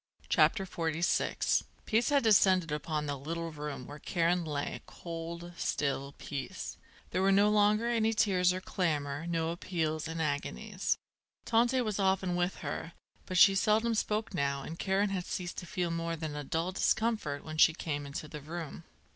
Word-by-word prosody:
CHAPTER 195 -3 +4
XLVI 165 -2 +1 0.2
Peace 225 +2 +2
had 285 -2 +3
descended 190 -6 +5
upon 150 0 -2
the 145 -1 -2
little 165 +4 -4
room 150 -4 -6
where 145 +3 -9
Karen 175 +2 +1
lay, 145 -3 -3
cold, 170 0 -7
still 140 -1 -1
peace. 140 -2 -5 0.4
There 185 - 0
were 195 +1 +4
no 200 +2 +5
longer 210 +2 +3
any 225 -2 +2
tears 185 -5 +3
or 185 +1 -3
clamour, 150 -5 -1
no 165 -1 0
appeals 160 -3 -2
and 165 0 -4
agonies. 145 - -1 0.5
Tante 240 +3 +3
was 215 -4 -2
often 190 -2 +2
with 175 +1 0
her; 165 - -4 0.3
but 185 - -2
she 195 +3 +8
seldom 220 +3 +2
spoke 215 -1 -1
now 140 -4 0
and 165 +4 -7
Karen 195 +1 +1
had 185 -2 -3
ceased 180 -1 -4
to 175 - -9
feel 175 -1 -1
more 165 0 -2
than 155 -2 -5
a 145 - -4
dull 165 +5 -1
discomfort 210 -7 0
when 155 0 -6
she 165 - +8
came 145 -3 -4
into 140 +2 -5
the 150 0 -8
room. 165 +1 -6
170 Hz, 170 wpm, -31 LUFS, 150-195 Hz, 0.5 s, she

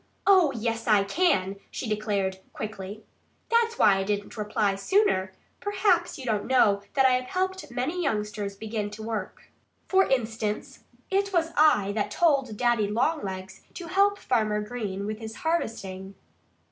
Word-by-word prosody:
"Oh, 370 -7 +6
yes, 230 0 -2
I 210 -3 +5
can!" 200 - +1
she 245 - -5
declared 205 -3 -1
quickly. 210 -3 -6
"I - - -8
was 205 - -6
thinking. 215 0 -20 0.6
That's 460 - -12
why 195 -2 +5
I 195 - 0
didn't 205 +2 -3
reply 210 -2 0
sooner. 195 - +1 0.3
Probably 385 -4 +2
you 265 - -8
don't 215 -4 -1
know 210 -6 +4
that 270 -1 +4
I 260 - +6
have 250 0 +1
helped 375 +3 -2
many 265 +9 -2
youngsters 210 - -2
to - - -27
begin 215 -1 -3
to 210 +1 -9
work. 220 -4 -5 0.4
For 385 0 +4
instance, 225 -4 -2 0.3
it 395 +1 +1
was 335 -3 +1
I 250 -10 +4
that 210 0 -1
told 270 -6 +1
Daddy 240 -3 +2
Longlegs 200 -6 -2
to 355 - -6
help 400 +2 +3
Farmer 215 - 0
Green 210 -3 -4
with 215 +1 -4
his 220 -1 -7
harvesting." 195 - -3
220 Hz, 165 wpm, -27 LUFS, 205-310 Hz, 0.6 s, Oh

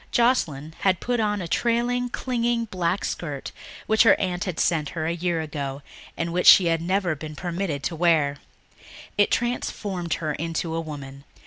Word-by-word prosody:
Joscelyn 160 - +1
had 185 -2 +2
put 245 -1 -1
on 210 -2 0
a - - -5
trailing, 240 +4 +1
clinging 240 -2 -1
black 185 -2 -1
skirt 145 -5 -4 0.3
which 220 0 +3
her 225 - +6
aunt 185 0 -1
had 185 -4 -4
sent 155 -4 +1
her 155 - -1
a 165 - 0
year 170 -1 -1
ago 140 -3 -5 0.3
and 170 0 -2
which 180 0 +1
she 185 - +9
had 165 -1 +1
never 185 0 0
been 150 +1 -8
permitted 170 -3 -3
to 165 - -2
wear. 155 -4 +2 0.8
It 205 - +3
transformed 200 -7 -2
her 155 -2 -2
into 165 +1 -3
a 165 - -1
woman. 140 -3 -8
170 Hz, 175 wpm, -24 LUFS, 155-205 Hz, 0.8 s, she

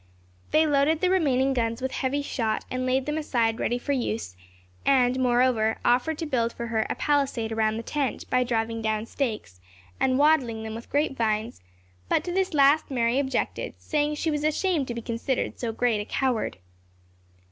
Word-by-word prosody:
They 315 +1 +4
loaded 295 +1 +2
the 365 +1 +2
remaining 270 -7 +2
guns 230 -2 -1
with 260 0 -3
heavy 280 +2 -1
shot, 225 -6 -2
and 255 0 -2
laid 260 +1 +1
them 300 +1 -1
aside 230 -6 0
ready 240 - 0
for 265 +4 -4
use; 230 - -2 0.5
and, 255 -2 +3
moreover, 245 -3 +2
offered 255 +6 +2
to 330 - -3
build 235 -6 0
for 235 - -5
her 225 -1 -1
a - - -1
palisade 275 -6 0
around 220 -1 +1
the 230 - -5
tent, 285 -1 -2
by 255 0 +2
driving 230 -1 -1
down 220 0 -1
stakes, 215 - -4 0.4
and 260 -1 +2
wattling 270 -7 +3
them 220 0 -5
with 230 +1 -8
grape 290 -1 0
vines; 220 - -1 0.5
but - - +2
to 355 - -4
this 370 -2 0
last 285 +2 +4
Mary 240 -1 +1
objected, 270 -1 -2
saying 300 -1 -1
she 315 +2 -1
was 295 -1 -2
ashamed 310 -1 +1
to 240 - -4
be 235 - -5
considered 235 +3 -2
so 235 -2 -2
great 225 -2 +1
a - - -6
coward. 250 -1 -1
255 Hz, 185 wpm, -26 LUFS, 230-285 Hz, 0.5 s, They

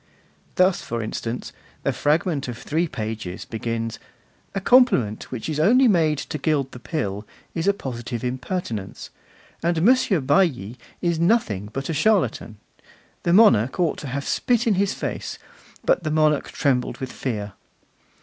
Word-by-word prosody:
Thus, 185 0 +3
for 115 -1 -4
instance, 115 +2 -4 0.3
a - - +3
fragment 150 -1 +1
of 120 -2 -5
three 165 +7 -1
pages 110 - -5
begins: 115 0 -3 0.6
'A 195 - -1
compliment 195 - +3
which 125 -4 -5
is 155 -1 -2
only 245 +11 +5
made 160 -7 +3
to 150 +2 -5
gild 145 -4 0
the 125 - -10
pill 105 - -3 0.3
is 165 +2 -2
a - - +7
positive 120 - -5
impertinence, 125 - -4 0.5
and 170 -1 +1
Monsieur 235 -5 +4
Bailli 135 - +1 0.3
is 170 -2 +1
nothing 165 - +1
but 135 +3 -4
a 165 - -2
charlatan; 155 - +1 0.6
the 170 - 0
monarch 175 - +5
ought 170 -4 +1
to 145 - -6
have 140 +2 -4
spit 240 -2 +1
in 225 - +3
his 195 +1 +1
face, - - -4 0.5
but - - +3
the 155 - -2
monarch 155 -1 +2
trembled 130 -4 0
with 130 -3 -5
fear. 105 -6 -4
145 Hz, 150 wpm, -23 LUFS, 115-175 Hz, 0.6 s, a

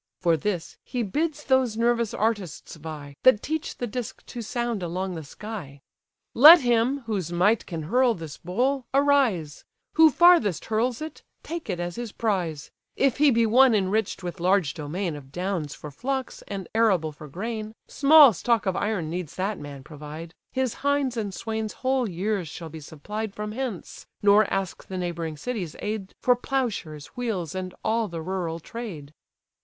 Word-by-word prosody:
For 170 -1 +3
this, 175 +1 -3
he 245 -2 -2
bids 300 - -2
those 260 -5 +2
nervous 235 -1 +2
artists 205 -9 -2
vie, 150 -3 -8
That 255 -5 +5
teach 315 +2 -3
the 245 - -2
disk 240 0 -6
to 240 - -7
sound 235 -1 -2
along 180 +2 -3
the 160 -2 -6
sky. 165 -4 -8 0.5
"Let 310 +7 +10
him, 245 +3 +2
whose 200 -8 -3
might 195 +6 +2
can 165 -3 -4
hurl 240 +7 +3
this 160 -4 -8
bowl, 250 +8 -1
arise; 270 - +2 0.3
Who 320 -1 +7
farthest 305 - +5
hurls 235 +5 0
it, 315 - -8 0.2
take 335 -6 -6
it 180 -3 -2
as 175 +2 -4
his 240 -3 -5
prize; 180 -9 -2 0.2
If 275 -2 +2
he 295 0 +5
be 230 -3 +3
one 245 +2 +6
enrich'd 200 0 0
with 175 +1 -5
large 180 -3 +2
domain 165 +3 -3
Of 135 -2 -11
downs 175 -4 -3
for 150 - -9
flocks, 260 - -3
and 195 -3 -5
arable 195 -9 +3
for 150 +1 -11
grain, 215 - -5
Small 290 -3 +7
stock 230 +4 +1
of 190 -2 0
iron 200 -6 -1
needs 170 -1 -5
that 195 +2 -2
man 140 -2 -9
provide; 155 +2 -9 0.2
His 260 -3 0
hinds 285 -3 +1
and 210 -4 -2
swains 220 +2 -4
whole 260 -3 +2
years 190 0 -2
shall 165 +2 -8
be 160 +1 -8
supplied 200 +8 -6
From 210 0 -4
hence; 235 -5 -5 0.2
nor 205 +1 +5
ask 195 -3 -3
the 190 - -5
neighbouring 170 -3 -3
city's 185 -2 -4
aid 210 -2 -4
For 250 - +4
ploughshares, 230 - -3
wheels, 210 -10 -2
and 185 -1 -5
all 225 0 +1
the 165 -3 -6
rural 175 -2 -3
trade." 170 -8 -8
205 Hz, 170 wpm, -25 LUFS, 170-240 Hz, 0.5 s, Let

